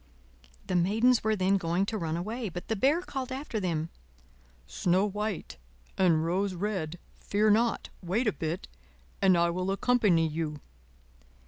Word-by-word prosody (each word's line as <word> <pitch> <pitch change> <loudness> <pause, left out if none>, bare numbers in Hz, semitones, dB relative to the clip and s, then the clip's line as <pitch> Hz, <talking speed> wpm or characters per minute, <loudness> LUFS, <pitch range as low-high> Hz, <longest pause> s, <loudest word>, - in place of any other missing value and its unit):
The 185 - -2
Maidens 220 +8 +3
were 220 0 +2
then 195 0 +2
going 175 +1 0
to 220 - -3
run 165 -1 -2
away, 220 +5 -3
but 175 +1 -8
the 225 - +1
Bear 280 - +3
called 265 -6 -5
after 260 -4 -3
them: 165 -4 -1 0.8
"Snow 185 +3 +1
White 210 -1 -4 0.4
and 165 -4 +3
Rose 185 +3 0
Red, 175 -4 -3 0.2
fear 210 +1 +2
not! 230 +2 +1
wait 195 +8 0
a 215 - +3
bit 165 0 -4 0.5
and 190 -2 +5
I 170 0 +3
will 185 +2 -2
accompany 195 -5 +3
you." 155 -1 -3
195 Hz, 150 wpm, -29 LUFS, 170-220 Hz, 0.8 s, and